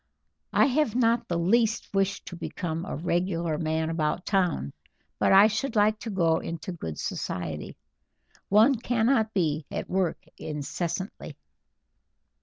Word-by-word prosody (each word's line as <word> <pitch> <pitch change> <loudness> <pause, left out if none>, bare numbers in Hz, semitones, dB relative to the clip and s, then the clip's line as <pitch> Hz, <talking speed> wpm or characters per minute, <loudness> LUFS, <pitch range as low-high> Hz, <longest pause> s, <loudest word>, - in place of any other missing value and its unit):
I - - +5
have 275 -4 +1
not 235 -1 +2
the 170 - -1
least 220 +7 +1
wish 195 0 0
to 180 - -8
become 165 0 -4
a - - -4
regular 170 -1 -1
man 160 0 -1
about 160 +1 -1
town, 180 - 0 0.5
but - - +3
I 195 +2 +8
should 220 +4 -1
like 215 +1 +3
to 230 - -6
go 170 -5 +2
into 170 +2 -5
good 80 - -6
society. 80 -4 -4 0.7
One 220 +7 +6
cannot 230 -1 +1
be 155 -5 0
at - - -5
work 185 -2 -1
incessantly." 170 +5 -4
185 Hz, 135 wpm, -27 LUFS, 160-220 Hz, 0.7 s, I